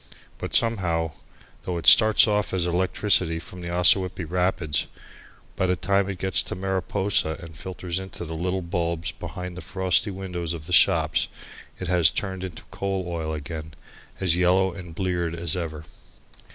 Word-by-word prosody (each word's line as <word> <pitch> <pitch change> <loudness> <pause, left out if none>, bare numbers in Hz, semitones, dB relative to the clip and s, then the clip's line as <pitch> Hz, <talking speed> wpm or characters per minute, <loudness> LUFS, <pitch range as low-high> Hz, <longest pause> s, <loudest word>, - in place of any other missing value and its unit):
But, - - -3
somehow, 90 -8 +2 0.5
though 90 -1 -3
it 85 - -5
starts 110 0 +8
off 105 -2 0
as 90 -2 +2
electricity 90 -1 +1
from 90 +2 -9
the 85 - -5
Ossawippi 90 0 +3
rapids, 90 -3 0 0.7
by 95 - 0
the 90 - +2
time 100 +2 +1
it 95 - -4
gets 95 +1 +1
to - - -6
Mariposa 95 -3 0
and 85 -2 -11
filters 90 +1 -5
into 95 -2 -7
the 80 - -6
little 90 +3 -2
bulbs 85 -1 -2
behind 90 -1 -7
the 90 - -7
frosty 95 +2 +1
windows 90 -4 -4
of 80 -2 -8
the 90 - -5
shops, - - +4 0.5
it 95 - -5
has 85 -2 +4
turned 95 -2 -4
into 90 -3 -7
coal 95 -1 -2
oil 80 -2 -3
again, 80 +1 -6 0.4
as 90 -4 +2
yellow 90 +1 +3
and 85 -3 -9
bleared 85 -3 -1
as 85 -1 -1
ever. 80 -3 -5
90 Hz, 165 wpm, -25 LUFS, 85-95 Hz, 0.7 s, starts